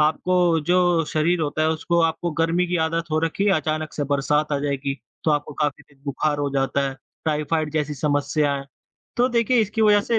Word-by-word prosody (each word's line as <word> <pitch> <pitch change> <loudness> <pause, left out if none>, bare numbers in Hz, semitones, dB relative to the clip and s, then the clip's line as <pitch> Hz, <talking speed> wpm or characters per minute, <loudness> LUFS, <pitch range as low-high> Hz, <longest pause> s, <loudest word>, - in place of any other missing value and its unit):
आपको 170 +2 +2
जो 175 -2 +3
शरीर 165 +4 +1
होता 155 0 -1
है 155 - +3
उसको 165 +2 0
आपको 165 +1 0
गर्मी 170 +2 +2
की 180 0 -1
आदत 165 0 -2
हो 155 - +1
रखी 165 +5 -1
है 205 - +4
अचानक 155 0 -2
से 145 - -2
बरसात 145 +2 +1
आ 145 - +1
जाएगी, 140 -1 -2 0.3
तो 160 - +3
आपको 145 0 -1
तेज 145 +1 -14
दिन 140 -1 -25
बुखार 145 +1 -1
हो 145 -1 0
जाता 135 0 +1
है, 135 - -6 0.3
टाइफाइड 155 0 0
जैसी 150 -1 -1
समस्याएँ। 145 0 0 0.5
तो 245 +1 +3
देखिए 240 0 +2
इसकी 220 +1 0
वजह 210 -1 +5
से 230 +2 0
155 Hz, 200 wpm, -23 LUFS, 145-175 Hz, 0.5 s, वजह